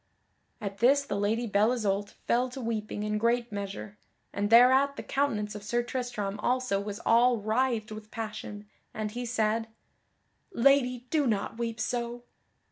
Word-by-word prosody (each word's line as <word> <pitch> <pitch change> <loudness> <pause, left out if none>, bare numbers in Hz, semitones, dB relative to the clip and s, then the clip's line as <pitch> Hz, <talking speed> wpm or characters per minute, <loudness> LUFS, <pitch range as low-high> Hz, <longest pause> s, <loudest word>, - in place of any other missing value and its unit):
At 200 -3 -6
this 275 +4 +5
the 210 -7 -4
Lady 215 +4 0
Belle 210 +1 +3
Isoult 205 -4 -1
fell 250 +2 +2
to 250 - -8
weeping 215 -3 -3
in 210 0 -1
great 235 +1 +1
measure, 200 0 -6 0.3
and 205 0 -1
thereat 260 +4 +6
the - - -6
countenance 220 -7 -1
of 210 - -7
Sir 240 +4 -1
Tristram 240 -5 -3
also 250 -3 0
was 205 +1 -5
all 240 +1 +5
writhed 220 +1 0
with 215 0 -8
passion, 215 -2 -6 0.3
and 215 -1 -3
he 245 +2 -4
said, 225 -1 0 0.8
"Lady, 250 -4 +3
do 300 -4 +2
not 215 +1 -1
weep 230 -1 -3
so!" 240 +1 -3
225 Hz, 155 wpm, -29 LUFS, 210-245 Hz, 0.8 s, thereat